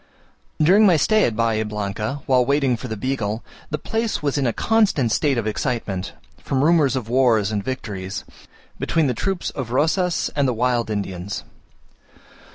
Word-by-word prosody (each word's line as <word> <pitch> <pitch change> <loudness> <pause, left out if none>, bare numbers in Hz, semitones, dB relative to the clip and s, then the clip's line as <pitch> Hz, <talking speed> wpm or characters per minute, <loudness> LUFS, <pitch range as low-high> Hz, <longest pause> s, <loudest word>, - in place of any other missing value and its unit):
During 195 +7 +6
my 175 -4 +5
stay 215 +8 +3
at 115 - -1
Bahia 115 -1 +1
Blanca, 105 +5 -4
while 130 -2 +4
waiting 140 -1 +2
for 120 - -7
the 110 -2 -4
Beagle, 115 -3 -2 0.3
the 150 - -1
place 225 +2 -2
was 145 -2 0
in 140 -3 +1
a - - +2
constant 200 - +2
state 140 +1 +1
of 115 - -1
excitement, 110 -4 -2 0.3
from 135 0 -1
rumours 150 -5 +4
of 125 -4 -3
wars 115 -4 +3
and 105 -2 -2
victories, 100 -6 -5 0.6
between 165 -2 +1
the 130 - +1
troops 190 - -2
of 130 -4 -5
Rosas 165 +7 +1
and 140 -2 +2
the 125 - 0
wild 120 -1 0
Indians. 100 -2 -4
125 Hz, 165 wpm, -22 LUFS, 110-150 Hz, 0.6 s, During